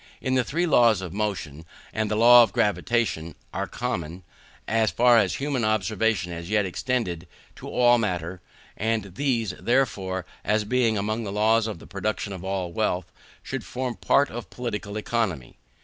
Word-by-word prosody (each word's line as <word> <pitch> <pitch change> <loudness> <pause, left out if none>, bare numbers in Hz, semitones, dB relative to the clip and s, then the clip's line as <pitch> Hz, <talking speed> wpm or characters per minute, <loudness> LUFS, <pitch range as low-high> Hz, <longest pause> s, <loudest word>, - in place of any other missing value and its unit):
The 130 -1 +1
three 165 +9 -1
laws 115 - +4
of 90 -3 -6
motion, 95 -8 -3 0.3
and 110 -1 -1
the 105 - 0
law 120 +2 +8
of 115 - +3
gravitation, 105 -6 0 0.2
are - - -2
common, 85 +3 -4 0.4
as 110 0 +2
far 120 -1 +5
as 100 -4 +1
human 135 -3 -1
observation 110 -2 0
has 85 +1 -7
yet 105 -1 +2
extended, 95 -4 -2 0.3
to - - -8
all 120 -1 +4
matter; 90 -4 -3 0.3
and 110 -3 -2
these, 115 -4 0
therefore, 100 -8 0 0.2
as 105 +1 +1
being 115 0 +1
among 110 +3 -2
the 100 - -4
laws 110 +2 +2
of 110 - -5
the - - -13
production 100 +1 -3
of 95 -1 -8
all 95 -2 -2
wealth, 95 -3 -1 0.3
should 135 -4 -4
form 125 +1 -4
part 140 0 +2
of 120 +1 -7
Political 105 -4 -5
Economy. 105 - -2
110 Hz, 165 wpm, -25 LUFS, 95-120 Hz, 0.4 s, law